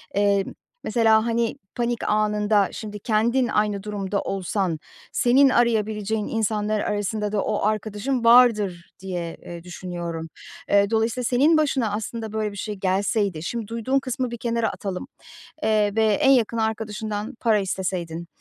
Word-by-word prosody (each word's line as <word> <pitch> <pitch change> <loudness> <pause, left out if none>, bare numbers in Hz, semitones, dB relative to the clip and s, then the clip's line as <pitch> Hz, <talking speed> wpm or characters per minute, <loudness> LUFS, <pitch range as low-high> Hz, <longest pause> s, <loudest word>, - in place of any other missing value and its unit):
eee, 200 -1 +3
m - - -8 0.3
mesela, 220 -1 +3
hani, 230 0 0 0.2
panik 240 -1 -1
anında 210 -1 +2
şimdi 210 -1 -7
kendin 235 +4 +1
aynı 210 -3 0
durumda 205 -1 -2
olsan, 185 -3 -2 0.3
senin 270 +3 +4
arayabileceğin 220 -3 +1
insanlar 215 -1 0
arasında 210 0 -2
da 210 - 0
o 205 - -1
arkadaşın 215 +4 -1
vardır 220 -7 +4
diye, 175 -3 -4
eee, 170 -1 -8
düşünüyorum. 175 -2 -6 0.4
Eee, 200 0 +4
dolayısıyla 225 +2 0
senin 280 +7 +4
başına, 270 -8 +1
aslında, 220 +1 -4
böyle 215 -1 -1
bir 200 - -10
şey 210 +1 -4
gelseydi 190 -2 0
şimdi 230 +3 -4
duyduğun 230 +4 0
kısmı 255 -2 -3
bir 235 - -5
kenara 230 -1 0
atalım, 190 +4 -5 0.6
eee, 210 -2 +2
ve 220 0 +3
en 270 +6 +4
yakın 230 -3 +3
arkadaşından 220 -1 -3
para 220 -3 +3
isteseydin 180 -3 -3
215 Hz, 145 wpm, -24 LUFS, 200-230 Hz, 0.6 s, senin